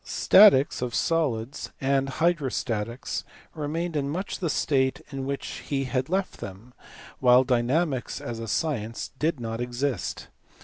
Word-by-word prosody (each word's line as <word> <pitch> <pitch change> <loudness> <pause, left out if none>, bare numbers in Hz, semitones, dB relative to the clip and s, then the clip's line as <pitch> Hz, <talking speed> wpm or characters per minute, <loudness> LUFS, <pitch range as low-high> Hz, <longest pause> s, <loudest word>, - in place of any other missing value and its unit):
Statics 175 -12 +5
(of 125 -2 -2
solids) 135 -7 -1
and 135 0 +1
hydrostatics 130 -7 -1 0.3
remained 160 +2 -3
in 140 -2 0
much 185 +7 -3
the 170 - -1
state 130 -3 +1
in 135 -1 -4
which 140 0 -4
he 135 -1 0
had 130 +1 -2
left 190 +1 -1
them, 100 +6 -9 0.5
while 125 0 +6
dynamics 130 +3 0
as 115 -1 -5
a 115 - -5
science 115 -3 -2
did 155 -2 0
not 115 0 -4
exist. 125 -2 -2
135 Hz, 135 wpm, -26 LUFS, 120-155 Hz, 0.5 s, while